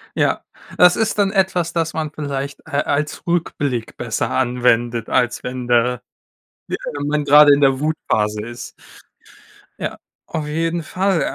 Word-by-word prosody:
Ja. - - +1 0.3
Das 180 0 +7
ist 220 -1 0
dann 195 -1 +3
etwas, 185 -4 +1
das 165 -2 -1
man 155 -2 -3
vielleicht, 140 -2 -5
äh, 160 - -14
als 150 +3 -2
Rückblick 145 -8 -2
besser 115 -4 -2
anwendet, 120 -2 +1
als 125 -2 +1
wenn 125 -1 -5
da 120 0 +2 0.7
wie - - 0 0.2
wenn 145 - -3
man 150 0 0
gerade 145 0 +8
in 145 - +2
der 135 -1 +4
Wutphase 110 -9 -1
ist. 120 +1 -8 1.1
Ja, - - -4 0.3
auf 155 -2 -3
jeden 165 +2 -1
Fall. 185 +1 0
145 Hz, 150 wpm, -20 LUFS, 125-165 Hz, 1.1 s, gerade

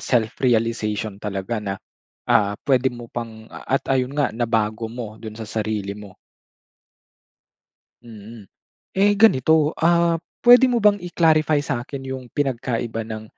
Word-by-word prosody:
self-realization 110 -3 0
talaga 105 +2 -3
na 100 -2 -3 0.5
ah, 100 -1 +2
puwede 130 -1 +3
mo 120 -1 -10
pang 110 -2 -7
at 135 - -3
ayun 130 -1 +1
nga 145 -2 +1
nabago 115 -1 -1
mo 115 -3 -7
dun 110 0 -10
sa 110 - -6
sarili 105 -2 -3
mo. 100 -2 -12 1.9
Mm. 110 -1 -12 0.5
Eh 205 +2 +4
ganito, 160 - +4
ah, 170 0 +3 0.3
puwede 245 +2 +8
mo 240 -2 +1
bang 205 -1 +5
i-clarify 155 -4 +2
sakin 135 0 -4
yung 130 -1 -6
pinagkaiba 120 -4 -2
ng, 110 -1 -7
120 Hz, 125 wpm, -22 LUFS, 110-145 Hz, 1.9 s, puwede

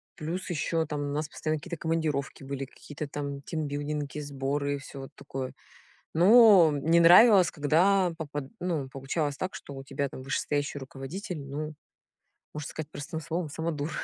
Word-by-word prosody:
Плюс 170 +5 -4
еще 165 0 0
там 150 -1 -3
у 145 0 -2
нас 150 +1 -1
постоянно 155 0 -2
какие-то 170 +1 -6
командировки 155 -4 -2
были, 135 0 -4
какие-то 145 +2 -8
там 140 -1 -5
тимбилдинги, 145 -1 -3
сборы 140 0 -2
и - - -4
всё 135 0 -9
вот 135 - -9
такое. 135 -2 -6 0.6
Ну, 195 -2 +8
не 155 +4 +3
нравилось, 185 +2 +8
когда 175 +5 +3
попад 145 -2 -4 0.2
ну, 160 -7 -1
получалось 140 +2 -2
так, 185 +4 -4
что 140 - -8
у 135 0 -8
тебя 140 0 -2
там 130 - -9
вышестоящий 145 +2 -1
руководитель- 145 +6 -6
ну, 150 +3 -5 0.8
можно 150 -1 -5
сказать 155 -1 -6
простым 160 +2 -5
словом, 165 +1 -3
самодур. 160 0 -3
150 Hz, 160 wpm, -28 LUFS, 140-165 Hz, 0.8 s, Ну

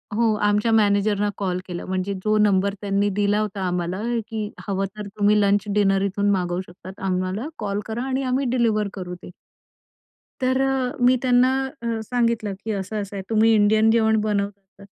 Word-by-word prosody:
हो 225 -1 +3
आमच्या 210 +2 +2
मॅनेजरना 205 -1 +2
कॉल 185 -2 -1
केला. 175 -1 -6
म्हणजे 190 +1 -2
जो 215 0 +2
नंबर 200 -1 +3
त्यांनी 200 0 +1
दिला 205 +1 +2
होता 205 -2 -3
आम्हाला 180 +2 -2 0.3
की 220 -2 -4 0.2
हवं 195 0 0
तर 210 -1 -6
तुम्ही 210 +1 +4
लंच 200 0 +3
डिनर 195 -2 +3
इथून 200 +1 0
मागवू 180 -2 0
शकता 180 +1 -12 0.2
आम्हाला 185 +6 -1
कॉल 205 -1 -2
करा 225 +3 -4
आणि 265 0 -1
आम्ही 260 +1 0
डिलिव्हर 225 -4 +1
करू 180 -2 -6
ते. - - -9 1.1
तर 260 +1 +2
अ, 270 0 0
मी 255 +1 +5
त्यांना 250 0 +4 0.3
अ, 230 -1 -2
सांगितलं 230 -3 0
की 220 - -2
असं-असं 200 0 -4
आहे. 195 - -4
तुम्ही 225 +1 +4
इंडियन 215 +1 +4
जेवण 220 -1 +3
बनवतात 200 -2 -3
205 Hz, 170 wpm, -23 LUFS, 195-225 Hz, 1.1 s, मी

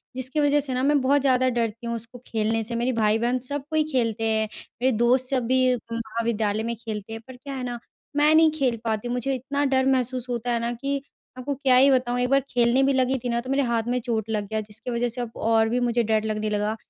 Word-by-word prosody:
जिसकी 260 +3 -1
वजह 290 0 +3
से 275 -2 -2
ना 255 +1 -1
मैं 290 +1 +3
बहुत 280 +2 +3
ज़्यादा 255 -1 +3
डरती 235 -1 -2
हूँ 235 - -2
उसको 230 +2 -9
खेलने 225 0 0
से। 235 +2 -4
मेरे 240 +2 0
भाई-बहन 225 +3 +1
सब 285 -1 -3
कोई 315 -1 +2
खेलते 230 -4 0
हैं 220 0 +1 0.3
मेरे 260 +1 +3
दोस्त 250 +2 +2
सब 255 -3 0
भी 255 0 +3 0.2
महाविद्यालय 225 -2 -1
में 235 +1 -2
खेलते 220 -1 -6
हैं 225 - -7
पर 260 - -10
क्या 275 +3 -8
है 260 - -4
न 240 - -6 0.4
मैं 295 +1 +4
नहीं 320 0 +6
खेल 250 -4 +1
पाती 220 0 -2
मुझे 250 +2 -1
इतना 275 +3 -2
डर 265 -1 +2
महसूस 255 -1 -1
होता 240 0 -2
है 235 - +1
ना 235 +1 -2
कि 275 +3 -3 0.4
आपको 265 +3 -3
क्या 265 -1 +3
ही 265 +2 +6
बताऊँ। 250 -2 +1
एक 250 0 +1
बार 275 +1 +5
खेलने 240 +2 +3
भी 275 +1 +3
लगी 260 0 +2
थी 245 - -4
न 235 0 0
तो 255 - -9
मेरे 275 +1 +2
हाथ 235 -2 0
में 250 +1 +1
चोट 225 -3 -2
लग 210 -2 -2
गया 220 +2 -2
जिसकी 215 +3 -7
वजह 240 +1 0
से 240 +2 -5
अब 240 -2 -5
और 225 0 +2
भी 245 - 0
मुझे 240 -1 +1
डर 220 -1 +1
लगने 215 0 -2
लगा 210 +1 -1
245 Hz, 250 wpm, -24 LUFS, 225-260 Hz, 0.4 s, नहीं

